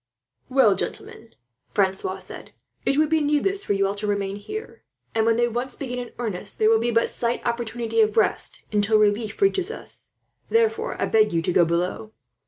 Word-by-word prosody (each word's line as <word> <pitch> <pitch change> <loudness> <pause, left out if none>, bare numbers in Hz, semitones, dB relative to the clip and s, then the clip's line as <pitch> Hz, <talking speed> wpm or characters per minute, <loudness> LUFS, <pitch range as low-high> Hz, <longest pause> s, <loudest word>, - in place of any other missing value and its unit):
"Well, 255 -7 +5
gentlemen," 225 +3 -6 0.4
Francois 190 -1 +1
said, 185 - -9 0.3
"it 275 - +2
would 305 0 +3
be 320 -1 +2
needless 300 +7 +1
for - - 0
you 195 0 +2
all 195 - 0
to 205 +1 -4
remain 200 -1 -1
here; 425 - -7 0.3
and 225 0 +2
when 230 - +4
they 240 +1 +2
once 240 +2 -3
begin 250 -3 -4
in 245 -1 -6
earnest, 220 -7 -3
there 215 - +4
will 225 - +5
be 235 +1 0
but 230 0 +2
slight 235 0 -2
opportunity 235 -1 0
of 215 0 +2
rest 220 - +1
until 210 +1 +3
relief 210 +1 +1
reaches 390 -1 +2
us. 460 - -5 0.4
Therefore, 450 0 +1
I - - +1
beg 215 -1 +3
you 165 -1 +1
to 180 - 0
go 175 - +5
below. 180 +6 -2
225 Hz, 190 wpm, -24 LUFS, 205-255 Hz, 0.4 s, Well